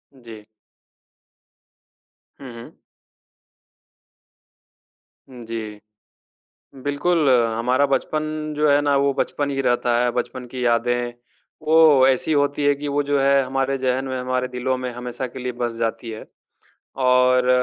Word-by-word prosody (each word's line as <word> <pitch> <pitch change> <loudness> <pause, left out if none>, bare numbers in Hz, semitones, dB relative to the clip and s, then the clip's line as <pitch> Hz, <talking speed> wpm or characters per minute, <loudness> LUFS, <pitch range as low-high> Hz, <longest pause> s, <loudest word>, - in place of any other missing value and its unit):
जी। 115 -4 -13 1.9
हुँ, 130 -3 -9
हुँ। 115 0 -12 2.5
उम, 125 -2 -11
जी। 110 -2 -6 1.1
बिल्कुल, 145 +2 +1 0.3
हमारा 125 +4 +1
बचपन 140 +3 -1 0.3
जो 150 0 +2
है 145 0 +4
ना 145 -1 +2
वो 140 0 +2
बचपन 145 +1 -2
ही 135 -1 -2
रहता 120 -1 +1
है, 125 - +1
बचपन 125 +1 -4
की 125 +1 -5
यादें 120 +1 0 0.5
वो 155 -4 +6
ऐसी 135 +4 +1
होती 145 0 +1
हैं 145 0 +4
कि 145 0 -4
वो 145 - +2
जो 145 - +3
है 140 0 +3
हमारे 135 +1 -1
जहन 130 0 -1
में, 130 - -3
हमारे 125 0 -2
दिलों 125 +1 -2
में 125 0 -4
हमेशा 125 +1 -5
के 125 - -10
लिए 125 0 -4
बस 120 -1 -2
जाती 115 0 -3
है 110 - -9 0.8
और 125 0 +3
130 Hz, 135 wpm, -21 LUFS, 120-140 Hz, 2.5 s, वो